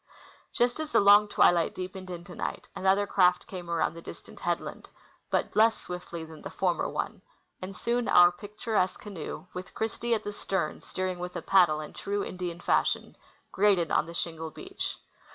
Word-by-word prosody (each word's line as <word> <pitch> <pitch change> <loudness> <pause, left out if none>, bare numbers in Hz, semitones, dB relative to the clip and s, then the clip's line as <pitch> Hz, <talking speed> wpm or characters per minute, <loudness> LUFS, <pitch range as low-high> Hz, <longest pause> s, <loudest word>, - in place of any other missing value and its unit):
Just 245 +3 +1
as 310 -1 -4
the - - +5
long 205 +1 +7
twilight 175 -4 +3
deepened 185 0 -6
into 175 0 -7
night, - - -4
another 195 +2 +3
craft 180 -3 +3
came 180 -3 -8
around 165 -2 +1
the 165 - -9
distant - - -11
headland, - - -3 0.4
but - - 0
less 225 +1 +5
swiftly 170 -2 -6
than 160 -1 -12
the - - -6
/ormer 180 -3 0
one; - - -3 0.4
and 185 +1 -6
soon 240 +3 0
our 175 0 +7
picturesque 210 0 -2
canoe, 195 -3 -7
Avith 185 +1 -8
Christie 230 +2 0
at 215 - -4
the 205 - -4
stern 195 -1 -2
steering 185 -1 -3
with 180 0 -5
a - - -4
paddle 175 -5 +4
in 150 - -8
true 200 0 -2
Indian 175 -2 -5
fashion, - - +1 0.4
grated 190 -5 +3
on 155 - +2
the 170 - -8
shingle 160 -1 -3
beach. 380 - -5
185 Hz, 175 wpm, -29 LUFS, 175-205 Hz, 0.4 s, long